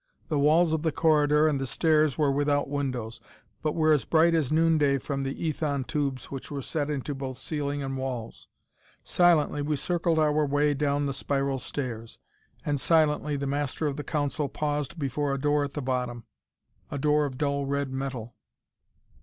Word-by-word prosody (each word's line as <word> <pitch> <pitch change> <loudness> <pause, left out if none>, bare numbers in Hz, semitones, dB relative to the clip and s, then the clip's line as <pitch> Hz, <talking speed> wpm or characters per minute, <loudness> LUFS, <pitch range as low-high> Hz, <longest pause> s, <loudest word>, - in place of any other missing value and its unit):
The 150 -3 +1
walls 160 +3 +4
of 160 - 0
the 160 0 +1
corridor 150 -1 +3
and 140 -3 0
the 135 - -2
stairs 155 0 +2
were 145 -3 +3
without 145 +1 +1
windows, 130 -6 -3 0.4
but 155 -1 -1
were 155 -1 +4
as 150 - +2
bright 165 +1 +4
as 155 -5 +1
noonday 155 -3 +3
from 140 +1 -3
the 135 0 -3
ethon 145 -3 -1
tubes 140 -4 -3
which 135 -1 -6
were 140 -2 -4
set 150 +1 -2
into 145 0 -3
both 135 -2 -5
ceiling 145 -1 -3
and 135 0 -3
walls. 130 -4 -5 0.6
Silently 165 -4 +3
we 150 +1 0
circled 170 +2 0
our 155 -1 +3
way 145 +1 +2
down 145 0 0
the 140 - -1
spiral 135 0 -1
stairs, 115 -5 -5 0.5
and 145 -2 0
silently 150 -2 +2
the 140 0 -3
Master 145 +2 -2
of 145 -2 -1
the 150 - -5
Council 145 -1 -1
paused 150 +1 -2
before 140 -1 -1
a - - -4
door 145 +1 +2
at 140 -1 -5
the 145 - -4
bottom 125 -2 -2 0.7
a - - -4
door 150 +1 +2
of 130 -2 -8
dull 140 -1 -1
red 140 -1 -1
metal. 130 -4 -4
145 Hz, 180 wpm, -27 LUFS, 135-150 Hz, 0.7 s, walls